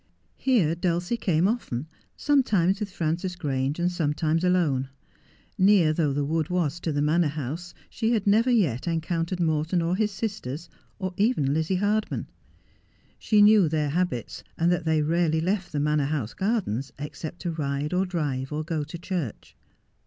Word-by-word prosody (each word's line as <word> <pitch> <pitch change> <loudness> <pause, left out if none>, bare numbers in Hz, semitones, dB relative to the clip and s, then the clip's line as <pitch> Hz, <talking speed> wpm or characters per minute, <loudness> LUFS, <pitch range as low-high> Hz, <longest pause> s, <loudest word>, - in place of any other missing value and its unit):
Here 215 - +2
Dulcie 175 +4 -1
came 180 -6 +2
often, 180 - -2 0.3
sometimes 210 - +2
with 210 -2 -3
Frances 175 +1 -2
Grange, 145 +1 -1
sometimes 160 0 0
alone. 160 -8 +2 0.7
Near 190 -5 +5
though 155 -3 +1
the 140 +1 -1
wood 160 +1 -1
was 170 -3 0
to 170 - -2
the 145 0 0
Manor 160 +2 +3
House 155 +4 -5
she 225 +1 -1
had 215 -4 0
never 220 +5 +4
yet 175 - +1
encountered 165 +2 -1
Morton 160 +1 +1
or 170 +2 0
his 215 +1 +1
sisters, 195 - -5 0.3
or 185 -2 -4
even 200 - +2
Lizzie 160 +4 0
Hardman. 205 +3 0 0.9
She 210 -2 +4
knew 205 -5 +6
their 150 -2 0
habits, 125 - -2
and 170 +1 +2
that 175 -2 0
they 160 -1 +2
rarely 160 0 +1
left 185 +3 -1
the 150 - -1
Manor 150 0 +1
House 135 -7 -2
gardens 190 - -1
except 150 +3 -6
to 175 - -1
ride 145 0 -2
or 185 +1 +2
drive 145 -7 -2
or 150 +1 -2
go 155 -2 -2
to 155 +3 -7
church. 170 - -5
165 Hz, 160 wpm, -26 LUFS, 150-185 Hz, 0.9 s, knew